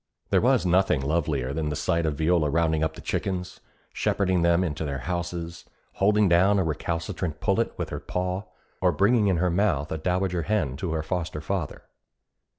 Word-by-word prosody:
There -, -, +4 dB
was -, -, +3 dB
nothing 90 Hz, -4 st, +3 dB
lovelier 70 Hz, -3 st, -1 dB
than 80 Hz, 0 st, -2 dB
the 75 Hz, -, -2 dB
sight 85 Hz, +2 st, 0 dB
of 75 Hz, -, -1 dB
Viola 80 Hz, -1 st, +2 dB
rounding 80 Hz, 0 st, +1 dB
up 80 Hz, 0 st, -1 dB
the -, -, -10 dB
chickens, 90 Hz, -2 st, -3 dB, 0.3 s
shepherding 95 Hz, -3 st, +1 dB
them 85 Hz, +1 st, +3 dB
into 80 Hz, -3 st, -3 dB
their 70 Hz, -2 st, -3 dB
houses, 85 Hz, -1 st, -4 dB, 0.3 s
holding 105 Hz, +1 st, +3 dB
down 95 Hz, +4 st, +4 dB
a 95 Hz, -, +2 dB
recalcitrant 80 Hz, 0 st, -3 dB
pullet 105 Hz, +7 st, 0 dB
with -, -, -3 dB
her -, -, -4 dB
paw, 90 Hz, +2 st, -3 dB, 0.4 s
or 90 Hz, -1 st, +4 dB
bringing 105 Hz, +6 st, +3 dB
in 95 Hz, -3 st, +2 dB
her 90 Hz, +1 st, +1 dB
mouth 85 Hz, -6 st, +1 dB
a 80 Hz, -, -2 dB
dowager 90 Hz, +1 st, 0 dB
hen 80 Hz, -9 st, 0 dB
to 80 Hz, +1 st, -3 dB
her 80 Hz, -1 st, -1 dB
foster 80 Hz, -2 st, -3 dB
father. 80 Hz, +1 st, -4 dB
85 Hz, 180 wpm, -26 LUFS, 80-95 Hz, 0.4 s, There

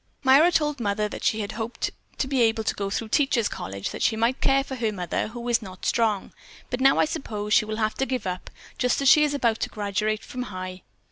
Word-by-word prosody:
Myra 280 Hz, +6 st, +6 dB
told 295 Hz, -4 st, +1 dB
Mother 210 Hz, -1 st, 0 dB
that -, -, -7 dB
she 220 Hz, -, +1 dB
had 200 Hz, -, -4 dB
hoped 225 Hz, +2 st, -3 dB, 0.3 s
to 265 Hz, -, -1 dB
be 265 Hz, -2 st, +1 dB
able 225 Hz, -1 st, +2 dB
to -, -, 0 dB
go 200 Hz, -1 st, -3 dB
through 220 Hz, +2 st, -3 dB
Teachers' 265 Hz, -4 st, +2 dB
College 100 Hz, +1 st, -5 dB
that -, -, -7 dB
she 225 Hz, -, +2 dB
might 230 Hz, +4 st, 0 dB
care 270 Hz, 0 st, +3 dB
for 270 Hz, -, -8 dB
her 225 Hz, -3 st, 0 dB
mother, 180 Hz, -4 st, -2 dB
who 235 Hz, +2 st, -7 dB
is 240 Hz, -1 st, +2 dB
not 185 Hz, -3 st, -9 dB
strong. 220 Hz, -4 st, +1 dB, 0.4 s
But 250 Hz, +1 st, -2 dB
now 270 Hz, +1 st, +5 dB
I -, -, +4 dB
suppose 215 Hz, -9 st, -3 dB
she 215 Hz, -, +5 dB
will 215 Hz, 0 st, -4 dB
have 215 Hz, -1 st, 0 dB
to 270 Hz, -, 0 dB
give 255 Hz, -3 st, -2 dB
up, 185 Hz, -1 st, -4 dB, 0.3 s
just 250 Hz, -1 st, +2 dB
as -, -, +2 dB
she 300 Hz, +3 st, +7 dB
is 290 Hz, -1 st, +1 dB
about 235 Hz, -5 st, +1 dB
to -, -, -2 dB
graduate 210 Hz, +1 st, -2 dB
from 250 Hz, -, -6 dB
High." 185 Hz, -1 st, -6 dB
225 Hz, 245 wpm, -25 LUFS, 210-260 Hz, 0.4 s, she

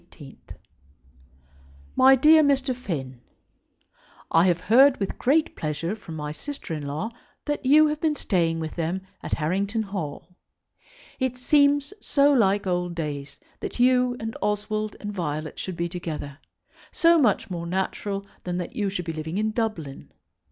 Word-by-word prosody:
MY 265 Hz, +1 st, +7 dB
DEAR 310 Hz, +4 st, +6 dB
MR. 270 Hz, -3 st, +2 dB
FINN, 135 Hz, -, -5 dB, 1.1 s
I 165 Hz, +2 st, +5 dB
have 175 Hz, -1 st, +1 dB
heard 260 Hz, +4 st, +6 dB
with 195 Hz, -, -3 dB
great 300 Hz, +5 st, +2 dB
pleasure 165 Hz, +5 st, -3 dB
from 175 Hz, -7 st, -10 dB
my 150 Hz, -1 st, -4 dB
sister 275 Hz, -, -7 dB
in 150 Hz, -2 st, -4 dB
law 155 Hz, +11 st, -3 dB, 0.3 s
that 295 Hz, -3 st, -2 dB
you 305 Hz, +3 st, +7 dB
have 300 Hz, 0 st, -1 dB
been 310 Hz, -2 st, +1 dB
staying 165 Hz, -, 0 dB
with 160 Hz, -1 st, -4 dB
them 170 Hz, +3 st, -2 dB, 0.2 s
at -, -, -5 dB
Harrington 195 Hz, +8 st, 0 dB
Hall. 180 Hz, -3 st, -6 dB, 0.8 s
It 260 Hz, -1 st, -1 dB
seems 285 Hz, +4 st, +3 dB
so 285 Hz, 0 st, +4 dB
like 200 Hz, -5 st, +3 dB
old 180 Hz, -1 st, -1 dB
days 145 Hz, -3 st, -5 dB, 0.2 s
that -, -, -6 dB
you 250 Hz, 0 st, +3 dB
and 225 Hz, 0 st, -5 dB
Oswald 210 Hz, +1 st, -1 dB
and 205 Hz, 0 st, -5 dB
Violet 155 Hz, -4 st, -4 dB
should 185 Hz, -3 st, -5 dB
be 170 Hz, -, -1 dB
together, 155 Hz, -5 st, -6 dB, 0.5 s
so 335 Hz, 0 st, +4 dB
much 225 Hz, -5 st, +2 dB
more 170 Hz, -1 st, -4 dB
natural 195 Hz, +2 st, -2 dB, 0.2 s
than 180 Hz, -1 st, -3 dB
that 180 Hz, -, -5 dB
you 205 Hz, -2 st, 0 dB
should 180 Hz, -3 st, -4 dB
be 165 Hz, -, -3 dB
living 160 Hz, +3 st, -4 dB
in 215 Hz, +1 st, 0 dB
Dublin. 215 Hz, -, -4 dB
200 Hz, 150 wpm, -25 LUFS, 165-250 Hz, 1.1 s, MY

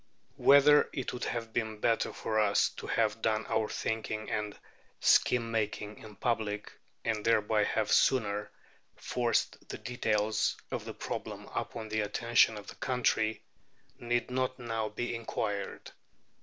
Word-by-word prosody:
Whether 145 Hz, +1 st, +6 dB
it 130 Hz, -, -3 dB
would 125 Hz, -, -4 dB
have 115 Hz, -2 st, -4 dB
been 110 Hz, -2 st, -2 dB
better 115 Hz, +1 st, +1 dB
for 110 Hz, -1 st, -1 dB
us 100 Hz, -1 st, +3 dB
to -, -, -7 dB
have 110 Hz, -1 st, +1 dB
done 110 Hz, 0 st, +1 dB
our 110 Hz, -1 st, 0 dB
thinking 110 Hz, -1 st, -3 dB
and 105 Hz, -1 st, -2 dB, 0.4 s
scheme 115 Hz, -2 st, +4 dB
making 105 Hz, -1 st, -2 dB
in 110 Hz, -2 st, -12 dB
public, 105 Hz, -3 st, -2 dB, 0.3 s
and 110 Hz, -2 st, 0 dB
thereby 105 Hz, -1 st, +3 dB
have 110 Hz, -1 st, 0 dB
sooner 105 Hz, -5 st, +3 dB, 0.5 s
forced 120 Hz, -2 st, -1 dB
the -, -, -5 dB
details 110 Hz, -3 st, 0 dB
of -, -, -3 dB
the -, -, -7 dB
problem -, -, -5 dB
upon 110 Hz, -2 st, -4 dB
the 110 Hz, 0 st, -1 dB
attention 115 Hz, +1 st, +3 dB
of 105 Hz, -, -9 dB
the -, -, -10 dB
country, 115 Hz, -4 st, 0 dB, 0.6 s
need 120 Hz, 0 st, -1 dB
not 130 Hz, 0 st, -1 dB
now 115 Hz, -3 st, -2 dB
be 120 Hz, +3 st, -3 dB
inquired. 105 Hz, -3 st, -4 dB
110 Hz, 140 wpm, -31 LUFS, 105-120 Hz, 0.6 s, Whether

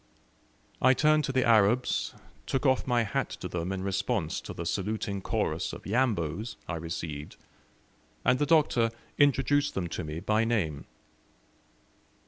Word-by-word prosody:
I 130 Hz, +1 st, +6 dB
turned 155 Hz, 0 st, +3 dB
to -, -, -2 dB
the 130 Hz, -1 st, +2 dB
Arabs, 115 Hz, +2 st, +3 dB, 0.3 s
took 135 Hz, +1 st, -1 dB
off 130 Hz, -1 st, +2 dB
my 120 Hz, -2 st, +3 dB
hat 105 Hz, -, -1 dB
to -, -, -4 dB
them 90 Hz, +1 st, -3 dB
in 95 Hz, -1 st, -3 dB
response 100 Hz, -2 st, -1 dB
to -, -, -8 dB
the 85 Hz, -, -6 dB
saluting 100 Hz, +2 st, -2 dB
chorus -, -, -1 dB
of -, -, -9 dB
"Yambos" 105 Hz, -, 0 dB
I 85 Hz, -, -3 dB
received, 80 Hz, -2 st, -5 dB, 0.9 s
and 125 Hz, +1 st, +4 dB
the 145 Hz, -, +1 dB
Doctor 145 Hz, -7 st, +4 dB, 0.3 s
introduced 145 Hz, +1 st, +3 dB
them 90 Hz, -3 st, -1 dB
to 90 Hz, -, -4 dB
me 75 Hz, +1 st, -5 dB
by 105 Hz, +4 st, +1 dB
name. 95 Hz, -11 st, -1 dB
110 Hz, 145 wpm, -29 LUFS, 90-130 Hz, 0.9 s, I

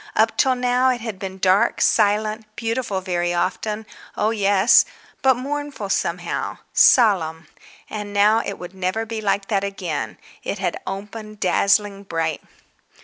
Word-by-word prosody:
Up 220 Hz, +1 st, +3 dB
till 260 Hz, -1 st, +3 dB
now 250 Hz, +1 st, +2 dB
it 250 Hz, -2 st, 0 dB
had 220 Hz, -4 st, -6 dB
been 190 Hz, -1 st, -6 dB
dark, 190 Hz, +4 st, +2 dB
silent, 215 Hz, +1 st, +2 dB
beautiful 225 Hz, -4 st, -2 dB
very 175 Hz, -2 st, -1 dB
often—oh 210 Hz, +3 st, -3 dB
yes—but 210 Hz, +5 st, +3 dB
mournful 280 Hz, -5 st, -4 dB
somehow. -, -, -2 dB, 0.2 s
Solemn. 170 Hz, -9 st, +4 dB, 0.4 s
And 210 Hz, -1 st, -6 dB
now 210 Hz, +2 st, +4 dB
it 200 Hz, -, -5 dB
would 180 Hz, +1 st, -9 dB
never 190 Hz, +4 st, -2 dB
be 225 Hz, -1 st, -5 dB
like 200 Hz, -1 st, 0 dB
that 200 Hz, -3 st, +1 dB
again—it 180 Hz, -, -5 dB
had -, -, -2 dB
opened 210 Hz, +2 st, -7 dB
dazzling 200 Hz, +1 st, +2 dB
bright. 165 Hz, -5 st, -2 dB
205 Hz, 130 wpm, -22 LUFS, 190-225 Hz, 0.4 s, Solemn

